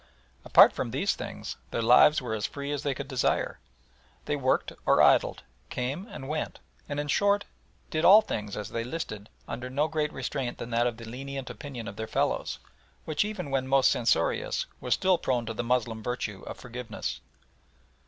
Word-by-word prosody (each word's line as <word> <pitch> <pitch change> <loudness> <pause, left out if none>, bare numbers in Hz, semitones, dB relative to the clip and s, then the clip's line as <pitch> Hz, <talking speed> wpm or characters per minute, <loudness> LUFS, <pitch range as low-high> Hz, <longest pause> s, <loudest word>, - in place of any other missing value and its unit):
Apart - - +7
from - - -3
these - - +1
things, - - -6
their 115 - -2
lives 130 +5 +6
were 120 - -3
as 105 -2 -1
free 140 0 -5
as 145 - -2
they 140 -2 -1
could 140 0 -5
desire. 130 -3 0 0.7
They 145 - 0
worked 130 -2 +1
or - - +4
idled, - - +4 0.3
came 135 - -3
and 135 - -8
went, 155 +1 -3 0.3
and, 145 0 -2
in 145 - -2
short, 205 +6 +2 0.5
did 155 +1 0
all 210 +5 +9
things 105 - -4
as 105 - -4
they 115 - -2
listed 110 -6 -5 0.2
under 125 +1 -5
no 145 +4 +1
greater 155 -1 -1
restraint 130 -4 -3
than 120 - -7
that 120 +1 +3
of 120 -2 -3
the 115 - -9
lenient 135 +3 -6
opinion 125 -6 -7
of 100 - -7
their 110 - -4
fellows, - - 0 0.5
which 155 +2 +1
even 205 -9 -5
when 130 -1 0
most 135 -1 +5
censorious, 115 -2 +1
was 125 - +1
still 185 -2 +2
prone 125 -3 0
to 115 - -4
the 115 - -3
Moslem 115 -2 0
virtue 110 -4 -3
of - - -6
forgiveness. 125 -2 -6
130 Hz, 185 wpm, -28 LUFS, 115-145 Hz, 0.7 s, all